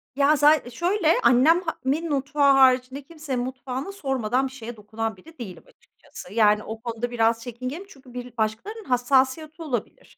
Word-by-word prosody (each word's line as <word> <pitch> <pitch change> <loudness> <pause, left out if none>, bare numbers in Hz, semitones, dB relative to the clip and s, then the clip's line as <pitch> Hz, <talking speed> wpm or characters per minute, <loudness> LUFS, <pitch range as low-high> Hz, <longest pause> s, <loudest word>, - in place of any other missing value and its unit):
ya, 285 +2 +4
za 295 -3 +4
şöyle, 345 - +1
annem 260 +9 +5
ha 330 -3 -3
min 310 +5 0
mutfağı 280 0 +2
haricinde 260 +1 +3
kimsenin 300 -4 -5
mutfağına 260 +5 -5
sormadan 265 - -1
bir 260 - -11
şeye 240 -2 -8
dokunan 215 0 -4
biri 325 - -17
değilim, 195 -6 -8
açıkçası. 205 - -14
Yani, 210 -1 +4
o 220 0 -7
konuda 235 0 -4
biraz 230 -1 +1
çekingenim 255 - -6
çünkü 265 -7 -16
bir 245 -1 -8
başkalarının 225 - -3
hassasiyeti 265 +5 +1
olabilir. 255 -9 -5
260 Hz, 160 wpm, -24 LUFS, 235-300 Hz, -, annem